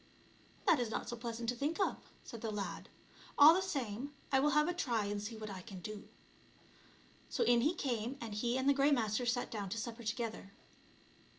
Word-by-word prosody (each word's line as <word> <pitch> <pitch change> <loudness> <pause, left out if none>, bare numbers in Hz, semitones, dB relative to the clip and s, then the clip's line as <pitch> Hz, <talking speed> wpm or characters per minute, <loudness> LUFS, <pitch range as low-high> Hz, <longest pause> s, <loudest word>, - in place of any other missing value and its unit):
" - - -28
That 315 - +6
is 240 -2 -1
not - - -3
so 240 - -3
pleasant 230 0 -5
to 245 - 0
think 290 +8 -2
of," 390 - +2 0.3
said 230 - -9
the 225 - -2
lad; 205 -2 -4 0.2
" - - -21
all 295 +3 +10
the 370 - +2
same, 275 - -3 0.2
I 265 - +5
will 290 +2 +3
have 300 +2 +3
a 355 - 0
try 235 -11 0
and 205 0 -2
see 220 +2 -6
what 215 -1 -6
I 190 -1 -6
can 190 -1 -9
do." 210 +3 -7 1.2
So - - +1
in 240 -1 +4
he 310 +8 +2
came, 245 -2 -2
and 225 -3 -6
he 235 +4 0
and 260 +1 0
the 280 - +6
Grey 280 +1 +4
Master 240 -3 +1
sat 245 +1 0
down 205 -3 -4
to 220 - -3
supper 230 +1 -5
together. 220 -3 -4
235 Hz, 220 wpm, -35 LUFS, 215-275 Hz, 1.2 s, all